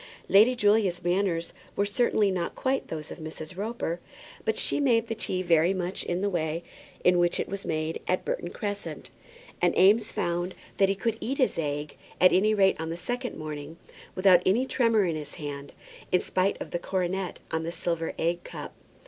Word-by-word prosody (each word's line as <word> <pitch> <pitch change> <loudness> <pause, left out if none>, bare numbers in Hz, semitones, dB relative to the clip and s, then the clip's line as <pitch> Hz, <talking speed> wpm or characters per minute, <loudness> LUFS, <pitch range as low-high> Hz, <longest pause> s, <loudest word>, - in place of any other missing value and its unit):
Lady 220 +6 +6
Julia's 205 -5 +2
manners 175 -1 0 0.2
were 200 - +2
certainly 205 -1 +2
not 180 -2 -2
quite 265 +1 -1
those 155 -2 -5
of - - -8
Mrs. 155 +1 -7
Roper; 200 -4 -3 0.4
but 445 - 0
she - - +1
made 235 -5 +3
the 225 - -3
tea 185 -4 -1
very 170 +1 +3
much 185 0 -2
in 175 +1 -2
the 205 - +1
way 165 -1 -1 0.4
in 180 0 +5
which 175 0 +2
it - - -1
was 195 0 -5
made 155 0 -2
at 185 - 0
Burton 175 - -2
Crescent, 205 +2 -5 0.5
and - - +2
Eames 210 +4 +5
found 175 +1 -1 0.2
that 195 -1 +4
he 195 - +1
could 225 +3 -1
eat 270 +3 -2
his 260 - +1
egg, 145 -1 -3 0.2
at 185 - +6
any 215 +3 +4
rate 195 -5 +3
on 160 - -3
the 165 - -4
second 245 +7 -4
morning, 155 +1 -6 0.4
without 185 -2 +6
any 225 +8 +3
tremor 230 -6 +3
in 170 -3 0
his 150 -2 -7
hand, 145 -1 -6 0.4
in 180 - +4
spite 190 +2 0
of - - -7
the 175 - -1
coronet 185 0 -2
on 160 - 0
the 165 +1 -3
silver 170 -1 -2
egg 170 +1 0
cup. - - -8
185 Hz, 190 wpm, -27 LUFS, 165-205 Hz, 0.5 s, Lady